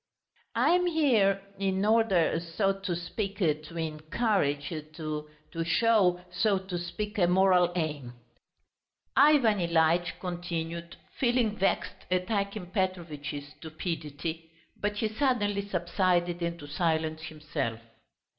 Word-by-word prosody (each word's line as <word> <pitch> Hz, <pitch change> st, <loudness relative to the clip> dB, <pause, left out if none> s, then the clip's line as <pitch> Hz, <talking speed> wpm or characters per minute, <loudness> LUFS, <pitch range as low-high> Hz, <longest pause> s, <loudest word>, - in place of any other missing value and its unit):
"I -, -, +4 dB
am 360 Hz, 0 st, +3 dB
here... 240 Hz, -, +3 dB, 0.2 s
in 195 Hz, 0 st, 0 dB
order, 210 Hz, -7 st, +3 dB
so 175 Hz, +4 st, 0 dB
to 195 Hz, -2 st, -3 dB
speak, 195 Hz, +4 st, -4 dB
to 155 Hz, -2 st, -1 dB
encourage... 155 Hz, -1 st, 0 dB, 0.2 s
to 155 Hz, -1 st, -4 dB, 0.4 s
show, 180 Hz, +1 st, +3 dB
so 200 Hz, +3 st, +2 dB
to 190 Hz, -2 st, -4 dB
speak, 210 Hz, +5 st, -4 dB
a 175 Hz, -, +5 dB
moral 180 Hz, -1 st, +4 dB
aim," 150 Hz, -7 st, -3 dB, 1.0 s
Ivan 270 Hz, -8 st, +5 dB
Ilyitch 170 Hz, 0 st, +2 dB
continued, 170 Hz, -1 st, -4 dB, 0.2 s
feeling 240 Hz, -4 st, +2 dB
vexed 195 Hz, -, -1 dB
at 185 Hz, +3 st, 0 dB
Akim 200 Hz, -3 st, -2 dB
Petrovitch's 160 Hz, -7 st, -3 dB
stupidity, 160 Hz, 0 st, -5 dB, 0.3 s
but 205 Hz, 0 st, -2 dB
he 220 Hz, +1 st, 0 dB
suddenly 210 Hz, -5 st, 0 dB
subsided 175 Hz, -1 st, +1 dB
into 170 Hz, -3 st, -3 dB
silence 160 Hz, 0 st, 0 dB
himself. 150 Hz, -7 st, -4 dB
175 Hz, 110 wpm, -29 LUFS, 160-205 Hz, 1.0 s, a